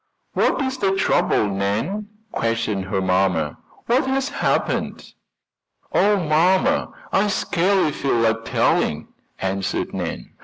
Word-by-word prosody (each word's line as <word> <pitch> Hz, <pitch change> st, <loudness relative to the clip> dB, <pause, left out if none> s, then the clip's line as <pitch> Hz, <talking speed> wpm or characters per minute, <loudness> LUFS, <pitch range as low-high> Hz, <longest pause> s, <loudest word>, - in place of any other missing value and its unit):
"What -, -, +2 dB
is 260 Hz, 0 st, -3 dB
the 195 Hz, -1 st, +1 dB
trouble, 190 Hz, -, +2 dB
Nan?" 105 Hz, -, -2 dB, 0.2 s
questioned 115 Hz, -4 st, -1 dB
her 95 Hz, 0 st, -1 dB
mamma. 90 Hz, -5 st, +1 dB, 0.3 s
"What 255 Hz, +3 st, +2 dB
has 270 Hz, +1 st, 0 dB
happened?" 285 Hz, -, -1 dB, 0.8 s
"Oh, 205 Hz, +1 st, +4 dB
mamma, 185 Hz, -, +2 dB, 0.2 s
I 200 Hz, +2 st, +3 dB
scarcely 190 Hz, -3 st, +1 dB
feel 140 Hz, -2 st, -1 dB
like 115 Hz, -1 st, +1 dB
telling," 75 Hz, -8 st, +1 dB, 0.3 s
answered 95 Hz, 0 st, -2 dB
Nan. -, -, -5 dB
150 Hz, 115 wpm, -22 LUFS, -, 0.8 s, Oh